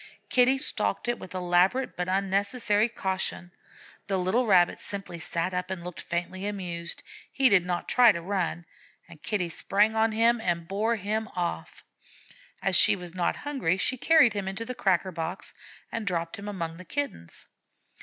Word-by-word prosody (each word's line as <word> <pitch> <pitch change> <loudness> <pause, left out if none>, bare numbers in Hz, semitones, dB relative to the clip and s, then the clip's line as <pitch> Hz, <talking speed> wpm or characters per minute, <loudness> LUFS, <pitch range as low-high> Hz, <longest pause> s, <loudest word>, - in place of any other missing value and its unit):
Kitty 255 +1 +4
stalked 100 - 0
it 240 0 -1
with 185 - -10
elaborate 185 +8 +2
but 180 0 -3
unnecessary 200 +3 +1
caution; 190 -4 -3 0.6
the 195 -1 0
little 200 +7 +1
Rabbit 180 -4 +4
simply 195 -4 -6
sat 170 +2 -2
up 180 0 -2
and 185 -2 -5
looked 180 -1 -7
faintly 180 +3 -3
amused. 175 -4 -5 0.3
He 270 -2 +4
did 195 -4 +5
not 175 -1 -2
try 245 -2 +6
to 180 - -4
run, 175 -2 -2 0.4
and 170 -3 -15
Kitty 185 -5 -1
sprang 210 +6 +1
on 220 0 +3
him 230 +1 +3
and 170 -4 -1
bore 215 +5 0
him 215 +1 -2
off. 175 -1 -4 0.8
As 195 -1 +3
she 175 - +7
was 180 -3 -6
not 180 -2 0
hungry, 260 - -1
she 255 +7 +1
carried 275 -2 +5
him 200 -2 -3
to 230 - -4
the 250 - -4
cracker 190 -4 +1
box 165 +2 -4 0.4
and 225 -3 -4
dropped 170 -1 -2
him 205 - -8
among 165 -5 -4
the 185 - -11
Kittens. 265 - -4
190 Hz, 170 wpm, -27 LUFS, 175-220 Hz, 0.8 s, she